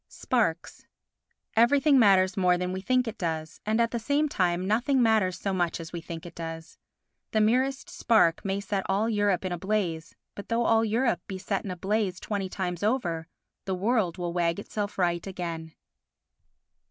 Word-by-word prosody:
Sparks 180 -10 -2 0.7
Everything 275 +5 +5
matters 190 -4 +5
more 180 -2 +3
than 180 +1 -2
we 190 - -4
think 255 +4 +1
it 225 0 -6
does, 160 -3 -4
and, 220 +2 +1
at 230 -1 +2
the 235 - -2
same 285 +6 +1
time, 180 -7 0
nothing 240 +7 +2
matters 220 -6 +3
so 195 - -2
much 175 -2 0
as 165 0 -8
we 170 - -4
think 165 0 -8
it 175 - -9
does. 165 -1 -8 0.5
The 215 - +3
merest 260 +7 +1
spark 230 - +2
may 195 0 -1
set 195 -1 -2
all 200 +3 +1
Europe 205 -4 +1
in 185 - -2
a 175 - -3
blaze, 180 -5 -2 0.2
but 200 - -9
though 230 0 +1
all 225 0 +4
Europe 235 +3 +1
be 190 - -5
set 190 +1 -2
in - - -4
a 180 - -5
blaze 195 -1 -1
twenty 200 -3 -3
times 180 -2 -3
over, 180 -8 -1 0.4
the 190 - -1
world 200 -2 0
will 175 -1 -3
wag 170 -1 +1
itself 205 0 -4
right 175 -1 0
again. 170 -4 -5
195 Hz, 185 wpm, -27 LUFS, 175-225 Hz, 0.7 s, Everything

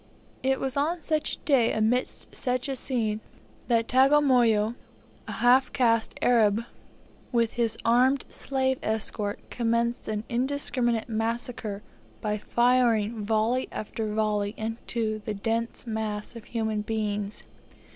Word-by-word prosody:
It 265 0 +1
was 265 -1 -2
on 320 +4 0
such 310 -1 0
a - - -25
day 260 -6 +3
amidst 220 +4 -1
such 250 +1 -1
a 270 - -2
scene, 225 -5 -1 0.5
that 230 -1 +2
Tagamoyo, 250 -5 +4 0.5
a - - -5
half 255 +2 +4
caste 230 -3 +1
Arab, 225 -2 +4 0.7
with 235 -2 +1
his 235 -2 0
armed 255 +4 +3
slave 265 -1 -1
escort, 215 -1 -2
commenced 235 0 0
an 215 -1 -2
indiscriminate 245 -2 0
massacre 225 -2 -3 0.4
by 210 -1 -2
firing 235 -2 +2
volley 220 +4 +1
after 215 0 -4
volley 210 -1 0
into 220 0 -2
the 210 - -3
dense 230 +4 -2
mass 220 -1 -3
of 230 - -9
human 220 -2 -2
beings. 210 -1 -2
230 Hz, 125 wpm, -27 LUFS, 215-250 Hz, 0.7 s, Tagamoyo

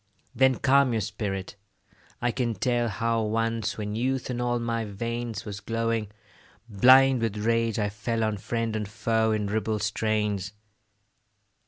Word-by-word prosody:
Then 130 0 +4
calm 135 -1 +3
your 110 - 0
spirit; 100 -1 -4 0.7
I 120 - +2
can 120 -2 -1
tell 120 +3 0
How 115 +3 0
once, 115 +1 -1
when 105 -1 -4
youth 130 +3 -1
in 120 0 -3
all 120 0 +1
my 115 -1 -2
veins 115 +1 -4
Was 100 -2 -6
glowing, 115 -1 -1 0.6
blind 130 +4 +6
with 110 -2 -1
rage, 115 +1 +1
I 105 -2 0
fell 115 +2 -2
On 110 -1 0
friend 115 +2 -2
and 105 -2 -2
foe 110 +1 +1
in 105 -1 0
ribald 105 0 -1
strains. 105 -2 -1
115 Hz, 150 wpm, -26 LUFS, 105-120 Hz, 0.7 s, blind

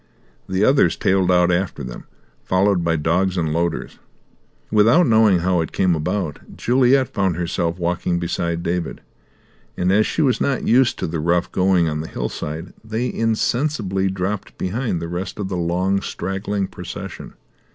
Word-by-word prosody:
The 95 +2 +2
others 135 - +4
tailed 95 -1 +2
out 90 0 +4
after 85 -4 -1
them, 60 -2 -8 0.4
followed 95 -1 +2
by 85 -1 +1
dogs 90 +4 +1
and 80 -3 0
loaders. 85 0 -2 0.7
Without 115 +11 +5
knowing 110 -6 +4
how 90 -1 +2
it 80 - -4
came 95 -2 +2
about, 80 0 -2 0.2
Juliet 130 +1 +3
found 95 -4 +1
herself 85 0 -2
walking 85 0 -1
beside 85 -1 -2
David; 85 -1 -2 0.8
and, 90 +1 +1
as 105 +2 +3
she 160 - 0
was 130 -3 +1
not 135 -3 0
used 125 +1 +3
to - - -2
the 80 0 -3
rough 85 +2 +1
going 90 -2 +2
on 75 -1 -2
the 80 - -6
hillside, 75 +7 -5
they 110 +3 -2
insensibly 115 -3 0
dropped 95 +2 -4
behind 105 0 -2
the - - -3
rest 90 +2 -5
of 100 -2 -3
the 95 - -3
long, 90 +3 0
straggling 100 +1 -3
procession. - - -8
95 Hz, 160 wpm, -21 LUFS, 85-105 Hz, 0.8 s, Without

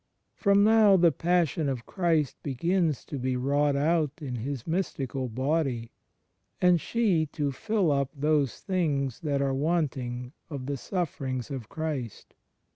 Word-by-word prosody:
For 200 -2 +2
now 210 -1 +6
the 170 -2 +5
Passion 165 -1 +1
of 125 -3 -4
Christ 165 -7 +1
begins 165 +3 0
to 140 - -5
be 130 0 -1
wrought 140 +2 +1
out 155 +2 +2
in 130 -5 -4
His 130 +1 -4
Mystical 135 -7 -2
Body, 130 -1 -1 0.7
and 180 -2 +4
she 195 -10 +1
to 145 -1 -2
"fill 195 +4 0
up 140 -2 +1
those 145 -2 +1
things 145 - -1
that 140 -3 0
are 135 -1 0
wanting 135 -5 -1 0.2
of 140 -4 -5
the 140 +1 -2
Sufferings 135 - -3
of 125 -6 -6
Christ." 150 -8 -5
145 Hz, 140 wpm, -28 LUFS, 130-170 Hz, 0.7 s, now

